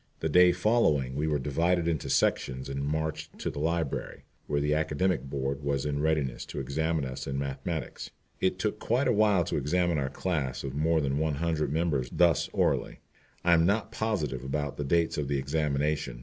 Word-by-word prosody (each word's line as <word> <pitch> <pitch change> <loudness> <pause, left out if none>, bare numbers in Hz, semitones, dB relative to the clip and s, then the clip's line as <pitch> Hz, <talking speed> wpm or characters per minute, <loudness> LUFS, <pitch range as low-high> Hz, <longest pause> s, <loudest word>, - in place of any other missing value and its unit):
The 80 - -1
day 90 +3 +6
following 90 - +2
we 75 +3 -1
were 75 -1 +1
divided 85 +5 +1
into 80 -4 -1
sections 65 +1 +1
and 70 0 -3
marched 80 +1 -3
to - - -3
the - - -6
library, 80 -1 -2 0.2
where 70 -1 0
the 75 +1 +1
Academic 80 -1 0
Board 70 +1 -2
was 70 -1 -1
in 75 -1 -1
readiness 75 -5 0
to - - -5
examine 80 +3 -1
us 65 +1 -6
in 70 0 -2
mathematics. 70 +4 -4 0.3
It 95 0 +1
took 105 +3 -2
quite 125 +4 +1
a - - +3
while 105 -4 +4
to - - -2
examine 85 +3 +1
our 65 -1 -1
class 75 -4 -2
of 70 -2 -4
more 80 +3 +2
than 70 0 0
one 80 -2 0
hundred 80 -2 -1
members 75 -6 0
thus 85 -4 +3
orally. - - 0 0.5
I 85 - +6
am 85 0 +4
not 105 +2 0
positive 75 - -2
about 75 +1 -3
the 75 - -2
dates 85 +1 +1
of 70 - -2
the 70 0 0
examination. 70 -2 -1
75 Hz, 190 wpm, -29 LUFS, 70-85 Hz, 0.5 s, day